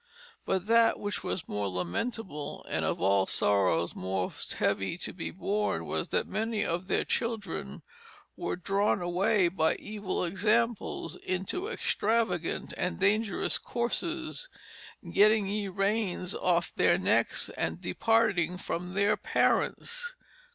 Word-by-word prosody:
But 190 Hz, -1 st, 0 dB
that 230 Hz, +1 st, +4 dB
which 205 Hz, 0 st, -3 dB
was 170 Hz, -, -3 dB
more 105 Hz, -1 st, -2 dB
lamentable 145 Hz, -, -4 dB
and -, -, -1 dB
of -, -, 0 dB
all 95 Hz, +1 st, +3 dB
sorrows 90 Hz, -4 st, +2 dB
most 95 Hz, 0 st, -2 dB
heavie 95 Hz, -, 0 dB
to -, -, -5 dB
be 175 Hz, -, -4 dB
borne 205 Hz, +4 st, -1 dB
was -, -, -2 dB
that -, -, +1 dB
many 220 Hz, 0 st, -1 dB
of 175 Hz, +2 st, -2 dB
their -, -, +1 dB
children, 210 Hz, -, -3 dB, 0.5 s
were -, -, -2 dB
drawne 195 Hz, +3 st, +1 dB
away 180 Hz, +2 st, +3 dB
by 160 Hz, -2 st, +1 dB
evill 210 Hz, -3 st, -3 dB
examples 215 Hz, +5 st, 0 dB
into 190 Hz, -, -3 dB
extravagant 220 Hz, -, 0 dB
and 180 Hz, -, -2 dB
dangerous 200 Hz, -5 st, +2 dB
coarses, 330 Hz, -, -2 dB, 0.6 s
getting 215 Hz, 0 st, +5 dB
ye 205 Hz, +1 st, -2 dB
raines 195 Hz, -1 st, 0 dB
off 175 Hz, -1 st, +1 dB
their -, -, +4 dB
necks, -, -, +2 dB
and -, -, -2 dB
departing 200 Hz, -7 st, +2 dB
from 180 Hz, 0 st, -4 dB
their 200 Hz, +1 st, +3 dB
parents." 480 Hz, +1 st, 0 dB
195 Hz, 125 wpm, -29 LUFS, 170-220 Hz, 0.6 s, getting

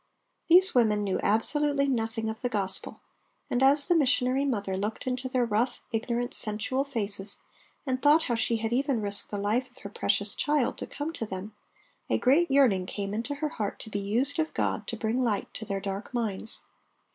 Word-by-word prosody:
These 370 Hz, +3 st, +7 dB
women 215 Hz, -4 st, +3 dB
knew 195 Hz, -2 st, -1 dB
absolutely 280 Hz, +6 st, +2 dB
nothing 225 Hz, -3 st, -1 dB
of 220 Hz, +1 st, -5 dB
the 245 Hz, -, -1 dB
Gospel, 195 Hz, -4 st, -3 dB, 0.5 s
and 245 Hz, -, +1 dB
as 280 Hz, +2 st, +5 dB
the 350 Hz, -, +4 dB
missionary 265 Hz, -2 st, +2 dB
mother 205 Hz, -8 st, -1 dB
looked 205 Hz, +3 st, -3 dB
into 255 Hz, 0 st, -2 dB
their 255 Hz, -1 st, +1 dB
rough, 235 Hz, +3 st, 0 dB
ignorant, 235 Hz, +2 st, -2 dB
sensual 220 Hz, +5 st, -1 dB
faces 205 Hz, -7 st, +1 dB, 0.5 s
and 260 Hz, -2 st, -1 dB
thought 300 Hz, +2 st, +5 dB
how 240 Hz, -, -1 dB
she 230 Hz, 0 st, +1 dB
had 225 Hz, +1 st, -2 dB
even 270 Hz, -1 st, +1 dB
risked 205 Hz, -1 st, -1 dB
the 205 Hz, -, -4 dB
life 215 Hz, +6 st, 0 dB
of -, -, -30 dB
her 200 Hz, -, -6 dB
precious 200 Hz, 0 st, 0 dB
child 295 Hz, -4 st, 0 dB
to -, -, -5 dB
come 295 Hz, +3 st, -5 dB
to 225 Hz, -, -4 dB
them, 195 Hz, +2 st, -6 dB, 0.6 s
a -, -, +2 dB
great 300 Hz, +8 st, +3 dB
yearning 235 Hz, -10 st, +3 dB
came 200 Hz, 0 st, -4 dB
into 235 Hz, +7 st, -3 dB
her 305 Hz, +1 st, -2 dB
heart 210 Hz, -7 st, -4 dB
to 220 Hz, -, -8 dB
be 205 Hz, -, -2 dB
used 240 Hz, +9 st, 0 dB
of 315 Hz, 0 st, -1 dB
God -, -, -1 dB
to -, -, -4 dB
bring 235 Hz, +3 st, 0 dB
light 215 Hz, -5 st, -1 dB
to 220 Hz, -, -6 dB
their 195 Hz, -1 st, -2 dB
dark 195 Hz, +1 st, -5 dB
minds. 220 Hz, -2 st, -3 dB
235 Hz, 195 wpm, -28 LUFS, 205-270 Hz, 0.6 s, These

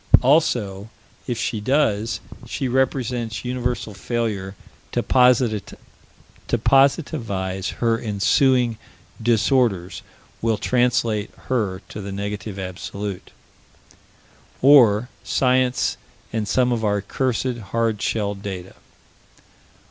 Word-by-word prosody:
Also, 110 Hz, -8 st, +2 dB, 0.4 s
if 120 Hz, -3 st, -2 dB
she 110 Hz, -2 st, -2 dB
does 115 Hz, -3 st, +1 dB, 0.3 s
she 135 Hz, -, -2 dB
represents 125 Hz, -3 st, -1 dB
universal 125 Hz, -3 st, -2 dB
failure 100 Hz, -2 st, -3 dB, 0.4 s
to -, -, 0 dB
positivize: 125 Hz, -5 st, +3 dB, 2.0 s
her 115 Hz, -1 st, 0 dB
ensuing 120 Hz, +3 st, +2 dB, 0.4 s
disorders 110 Hz, -4 st, +1 dB, 0.4 s
will 115 Hz, -1 st, +1 dB
translate 120 Hz, -4 st, +1 dB, 0.2 s
her 105 Hz, -7 st, -1 dB
to 105 Hz, -, -7 dB
the 100 Hz, 0 st, -6 dB
Negative 100 Hz, +1 st, -5 dB
Absolute. 95 Hz, +1 st, -6 dB, 1.3 s
Or 120 Hz, -5 st, +6 dB, 0.2 s
Science 130 Hz, -1 st, +1 dB, 0.4 s
and 110 Hz, -2 st, -1 dB
some 125 Hz, +4 st, +2 dB
of 115 Hz, -2 st, -1 dB
our 105 Hz, -1 st, +1 dB
cursed 125 Hz, +2 st, -1 dB
hard 115 Hz, -1 st, -1 dB
shelled 100 Hz, -3 st, -1 dB
data. 95 Hz, -2 st, -6 dB
115 Hz, 90 wpm, -22 LUFS, 100-125 Hz, 2.0 s, Or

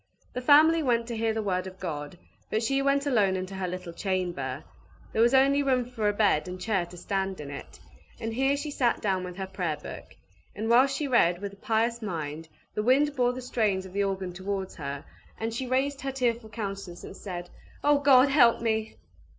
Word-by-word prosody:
The 250 Hz, -, -3 dB
family 310 Hz, +5 st, +6 dB
went 235 Hz, -5 st, +1 dB
to 235 Hz, -, -3 dB
hear 225 Hz, 0 st, +1 dB
the 220 Hz, 0 st, -2 dB
word 185 Hz, -2 st, -1 dB
of 185 Hz, 0 st, -10 dB
God; 150 Hz, +2 st, -5 dB, 0.3 s
but 220 Hz, +2 st, 0 dB
she 270 Hz, +4 st, +1 dB
went 280 Hz, +1 st, +2 dB
alone 210 Hz, -9 st, +3 dB
into 185 Hz, +1 st, -4 dB
her 190 Hz, -1 st, -3 dB
little 180 Hz, -1 st, -6 dB
chamber; 170 Hz, -8 st, -2 dB, 0.5 s
there 220 Hz, -, +2 dB
was 240 Hz, +3 st, +5 dB
only 275 Hz, +2 st, +5 dB
room 260 Hz, -3 st, +2 dB
for 230 Hz, -4 st, -1 dB
a -, -, +3 dB
bed 205 Hz, -6 st, +2 dB
and 180 Hz, 0 st, -6 dB
chair 190 Hz, -3 st, 0 dB
to 180 Hz, -, -12 dB
stand 190 Hz, +1 st, -2 dB
in 145 Hz, -1 st, -7 dB
it; 140 Hz, -, -9 dB, 0.4 s
and 225 Hz, 0 st, -3 dB
here 270 Hz, +4 st, +2 dB
she 295 Hz, +1 st, -4 dB
sat 245 Hz, -4 st, +1 dB
down 190 Hz, -3 st, 0 dB
with 180 Hz, -1 st, -6 dB
her 190 Hz, -, -3 dB
Prayer 180 Hz, -5 st, -3 dB
Book; 150 Hz, -, -10 dB, 0.4 s
and 220 Hz, +2 st, -3 dB
whilst 265 Hz, +3 st, +5 dB
she 295 Hz, -, -1 dB
read 175 Hz, -9 st, +3 dB
with 200 Hz, 0 st, -5 dB
a -, -, -14 dB
pious 230 Hz, +3 st, 0 dB
mind, 160 Hz, -5 st, -5 dB, 0.2 s
the 210 Hz, -, -1 dB
wind 275 Hz, +6 st, +3 dB
bore 245 Hz, -2 st, +2 dB
the 255 Hz, 0 st, -7 dB
strains 210 Hz, -6 st, 0 dB
of 185 Hz, -, -11 dB
the 200 Hz, 0 st, +1 dB
organ 190 Hz, -2 st, -2 dB
towards 190 Hz, +1 st, -4 dB
her, 140 Hz, -2 st, -5 dB, 0.3 s
and 225 Hz, 0 st, -2 dB
she 255 Hz, +3 st, -3 dB
raised 270 Hz, +2 st, 0 dB
her 270 Hz, -, -2 dB
tearful 240 Hz, -4 st, -1 dB
countenance, 195 Hz, -5 st, -6 dB
and -, -, -9 dB
said, 175 Hz, -3 st, -7 dB, 0.3 s
"O 290 Hz, 0 st, +4 dB
God, 275 Hz, -1 st, +6 dB
help 250 Hz, -5 st, +5 dB
me!" 220 Hz, -1 st, -1 dB
215 Hz, 215 wpm, -28 LUFS, 185-255 Hz, 0.5 s, family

